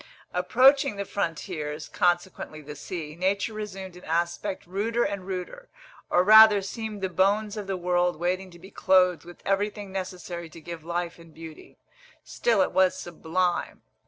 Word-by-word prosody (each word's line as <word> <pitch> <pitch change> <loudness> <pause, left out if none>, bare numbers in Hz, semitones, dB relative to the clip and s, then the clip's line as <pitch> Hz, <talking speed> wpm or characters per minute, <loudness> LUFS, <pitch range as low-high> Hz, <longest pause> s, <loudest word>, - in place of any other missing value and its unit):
Approaching 255 +7 +4
the 200 0 -4
frontiers, 160 -5 -4
consequently 175 -3 -1
the 150 0 -9
sea, 155 0 -6
nature 195 +5 0
resumed 195 -4 -7
an 180 - -13
aspect 175 +4 -2
ruder 215 +6 -1
and 195 -2 -3
ruder, 195 - -6 0.4
or 175 - +4
rather 215 +1 +9
seemed 215 0 -5
the 190 - 0
bones 200 +4 +1
of 210 -2 -6
the 195 -1 -2
world 180 0 +1
waiting 185 +3 -2
to 175 - -14
be 190 +4 -14
clothed 180 -3 +3
with 175 0 -13
everything 205 0 -1
necessary 180 -3 -6
to 165 - -12
give 165 0 -8
life 170 +1 -3
and 165 -1 -16
beauty. 160 -1 -12 0.5
Still 225 -5 +1
it - - -2
was 185 0 +3
sublime. 175 +1 -2
185 Hz, 160 wpm, -26 LUFS, 175-200 Hz, 0.5 s, rather